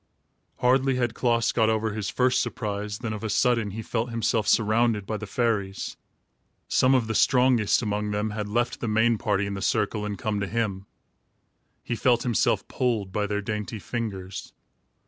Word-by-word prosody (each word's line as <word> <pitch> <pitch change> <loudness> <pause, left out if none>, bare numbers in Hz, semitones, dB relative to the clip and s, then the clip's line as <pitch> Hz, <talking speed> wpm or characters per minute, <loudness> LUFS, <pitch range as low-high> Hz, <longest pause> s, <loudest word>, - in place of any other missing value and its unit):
Hardly 130 +1 +3
had 120 -3 0
Klaas 115 -1 +1
got 110 -2 +2
over 110 -1 0
his 105 -2 -3
first 130 0 +2
surprise, 105 -2 -3
than 115 -2 -4
of 105 - -6
a 110 - -2
sudden 115 -1 +2
he 110 +3 -6
felt 115 +2 -2
himself 115 -1 0
surrounded 110 -1 +2
by 110 - -3
the 110 - -7
fairies. 100 -3 -1 0.7
Some 130 +1 +4
of 125 -3 +2
the 110 - -3
strongest 125 -3 +3
among 105 0 -1
them 105 +1 -1
had 105 -1 -4
left 120 +3 0
the 120 - -3
main 110 +1 +2
party 105 -1 0
in 100 - -3
the 100 - -5
circle 105 +1 0
and 105 -1 -3
come 105 +2 -2
to 100 - -2
him. 100 -2 -2 1.0
He 120 - -2
felt 120 +2 +2
himself 120 -3 +1
pulled 115 -7 -1
by 105 +1 -1
their 105 0 -1
dainty 105 +2 -4
fingers. 100 -4 -5
110 Hz, 180 wpm, -26 LUFS, 105-120 Hz, 1.0 s, Some